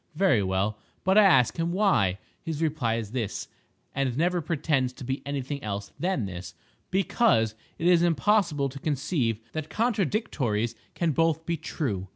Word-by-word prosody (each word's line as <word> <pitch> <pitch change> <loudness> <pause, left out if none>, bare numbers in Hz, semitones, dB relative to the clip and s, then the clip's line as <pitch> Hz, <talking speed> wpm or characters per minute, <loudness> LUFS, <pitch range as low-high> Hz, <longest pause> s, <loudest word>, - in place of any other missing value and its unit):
Very 160 - +3
well; 95 +3 0 0.2
but 190 +1 +3
I 215 - +8
ask 135 - +5
him 165 +1 0
why. 130 - +2 0.2
His 160 -3 -4
reply 150 -8 0
is 110 -3 -4
this—and 130 +2 -4
never 175 +2 +2
pretends 140 -5 0
to 130 - -10
be 130 +2 -3
any 140 -2 -2
thing 140 +2 -5
else 100 -1 -4
than 175 - 0
this—"Because 110 - 0 0.2
it 165 - -4
is 175 -1 +6
impossible 170 -2 +2
to 135 +1 -9
conceive 135 - -1
that 155 -1 -4
contradictories 185 - 0 0.2
can 170 -2 +1
both 165 +1 +1
be 170 - 0
true." 130 - -3
145 Hz, 155 wpm, -27 LUFS, 115-170 Hz, 0.2 s, I